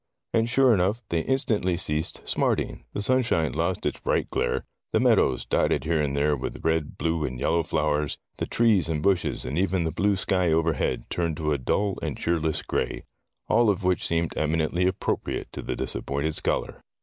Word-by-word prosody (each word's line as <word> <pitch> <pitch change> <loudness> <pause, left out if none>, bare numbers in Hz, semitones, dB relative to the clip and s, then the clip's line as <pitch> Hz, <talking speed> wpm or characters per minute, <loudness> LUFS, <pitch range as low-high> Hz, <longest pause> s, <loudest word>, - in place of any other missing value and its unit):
And 115 +1 +2
sure 130 0 +5
enough, 100 +5 +1
they 85 - +1
in 130 +11 +1
stantly 95 -8 0
ceased 75 -3 -2
smarting, - - 0
the 100 - -3
sunshine 115 - +2
lost 85 +6 -1
its - - -1
bright - - -1
glare, - - -1 0.3
the - - +4
meadows, 65 -2 +3
dotted - - +1
here 80 0 +1
and 70 -1 -1
there 75 +1 +2
with 65 -1 -6
red, 80 -2 0
blue, 80 -1 0
and 65 -3 -3
yellow 85 +5 +2
flowers, 75 -3 0 0.2
the - - -2
trees 110 -7 +3
and 75 -2 -1
bushes, 95 -3 +1
and 70 +6 -2
even 95 -2 +1
the 80 - -1
blue 100 +5 +1
sky 90 -2 +1
overhead 80 -2 0
turned 85 -3 -1
to 75 -2 0
a 70 - -1
dull 100 +10 0
and - - -3
cheerless 80 -2 0
gray. - - -2 0.4
All 120 -2 +4
of 100 -1 0
which 90 0 +1
seemed 85 0 -1
eminently 80 +3 +1
ap 95 - -1
propriate - - -2
to - - -5
the - - -3
disappointed 70 +3 -2
scholar. - - -1
85 Hz, 190 wpm, -26 LUFS, 75-95 Hz, 0.4 s, sure